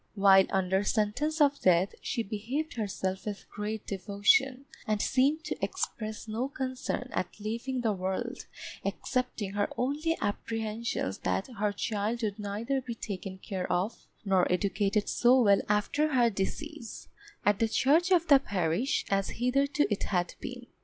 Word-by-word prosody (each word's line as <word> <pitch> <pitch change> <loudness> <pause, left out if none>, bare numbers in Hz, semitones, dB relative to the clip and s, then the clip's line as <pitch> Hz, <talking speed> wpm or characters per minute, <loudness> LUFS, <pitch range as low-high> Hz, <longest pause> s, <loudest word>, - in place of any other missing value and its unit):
While 195 -1 +6
under 190 +1 +1
sentence 225 +10 0
of 285 -1 +3
death, 180 +1 +4
she 235 -4 -2
behaved 235 +10 -3
herself 190 -3 -3
with 205 -1 -5
great 210 +1 -4
devotion, 205 +7 +2 0.2
and 215 -1 +1
seemed 280 +8 +2
to 305 - -5
express 215 0 -3
no 225 +4 -1
concern 260 -2 -3
at 185 - -3
leaving 235 +5 -3
the 225 -3 +1
world, 190 0 -3 0.4
excepting 250 -6 -2
her 205 0 0
only 300 +6 0
apprehensions 220 - -2
that 195 - -1
her 210 0 +2
child 215 +3 -2
would 210 -1 -2
neither 220 +7 -2
be 240 -2 -6
taken 195 -3 -6
care 185 -1 -4
of 180 +5 -1 0.2
nor 190 -3 +3
educated 200 +2 +1
so 250 +2 +4
well 200 -5 +5
after 285 +8 +1
her 240 -2 +4
decease, 235 +7 -5 0.4
at 205 -1 +3
the 225 - +3
charge 300 +10 +3
of 350 -3 +4
the 280 -2 +8
parish, 195 - 0
as 195 0 +1
hitherto 275 +4 +2
it 200 - -3
had 180 -3 0
been. 250 -2 -7
215 Hz, 150 wpm, -30 LUFS, 200-260 Hz, 0.4 s, the